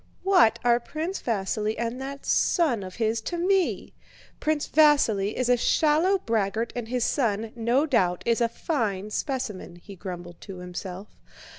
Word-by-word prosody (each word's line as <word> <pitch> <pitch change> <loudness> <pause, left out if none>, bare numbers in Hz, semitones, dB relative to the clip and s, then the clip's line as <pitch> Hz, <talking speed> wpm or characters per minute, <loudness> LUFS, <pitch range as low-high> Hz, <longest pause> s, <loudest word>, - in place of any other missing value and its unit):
"What 360 - +5
are 240 0 +4
Prince 320 +9 -4
Vasíli 215 0 -1
and 235 +3 -3
that 275 +1 -7
son 300 - +2
of 185 -1 -8
his 225 -1 0
to 345 +10 -4
me? 375 +1 0 0.5
Prince 310 -1 0
Vasíli 255 -10 +3
is 255 - 0
a 250 - +5
shallow 315 +9 +3
braggart 225 - -1
and 240 -2 -4
his 245 0 -1
son, 225 -5 0
no 240 +5 +2
doubt, 185 - +1
is 235 0 +1
a 235 - +3
fine 215 - -2
specimen," 235 - -4
he 195 +3 -12
grumbled 175 -2 -8
to 195 -3 -9
himself. 180 +2 -7
230 Hz, 155 wpm, -26 LUFS, 200-285 Hz, 0.5 s, What